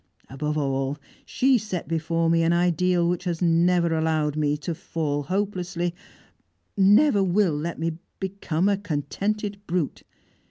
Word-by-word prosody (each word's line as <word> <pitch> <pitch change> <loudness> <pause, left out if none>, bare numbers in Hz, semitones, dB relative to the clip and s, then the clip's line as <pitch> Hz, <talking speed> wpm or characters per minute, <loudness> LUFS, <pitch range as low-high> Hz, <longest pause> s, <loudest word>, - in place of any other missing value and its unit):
Above 150 +3 -2
all, 135 0 -1 0.3
she 260 -1 +3
set 200 -5 -5
before 165 +1 0
me 165 0 +3
an 165 0 +2
ideal 175 0 +2
which 175 +1 -1
has 170 -2 -2
never 170 0 +3
allowed 160 -2 0
me 150 -1 +1
to 165 +3 -4
fall 150 -2 -3
hopelessly 180 0 -2 0.8
never 205 +3 +5
will 190 -2 +2
let 165 +3 -3
me 165 0 -3 0.2
become 190 -2 -1
a 200 -1 +2
contented 200 +5 -3
brute! 175 -4 -2
170 Hz, 135 wpm, -25 LUFS, 155-190 Hz, 0.8 s, never